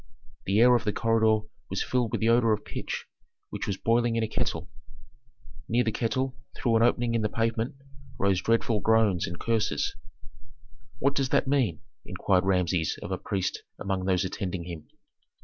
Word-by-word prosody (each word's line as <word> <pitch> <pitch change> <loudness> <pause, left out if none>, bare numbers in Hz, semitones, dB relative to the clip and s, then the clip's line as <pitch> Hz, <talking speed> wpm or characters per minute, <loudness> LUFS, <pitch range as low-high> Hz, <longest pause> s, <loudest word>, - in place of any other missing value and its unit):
The 100 +3 +3
air 125 +1 +7
of 120 - +1
the 105 -2 0
corridor 110 -2 +2 0.2
was 95 - -1
filled 125 -3 0
with 115 - -2
the 110 - +3
odor 115 -1 +4
of 105 - -3
pitch - - -5 0.5
which - - -4
was 100 -2 -1
boiling 115 +1 +2
in 115 - +1
a - - 0
kettle. - - -2 1.0
Near 120 +2 +3
the 110 - 0
kettle, 130 +4 -1 0.2
through 115 -2 +2
an - - +2
opening 120 0 +2
in 115 - +1
the 105 - 0
pavement, 115 +4 -1 0.4
rose 95 -2 +2
dreadful 115 +1 +1
groans 110 -4 +3
and 85 - -6
curses. 115 -2 0 1.0
"What 140 +3 +1
does 135 -2 0
that 135 - +2
mean?" 130 - +1 0.2
inquired 95 -2 +1
Rameses 90 -3 +1
of - - -6
a - - -2
priest 95 -2 -2 0.2
among 95 -1 -2
those 95 -1 +2
attending 95 -1 -3
him. 85 -3 -8
110 Hz, 175 wpm, -27 LUFS, 95-115 Hz, 1.0 s, air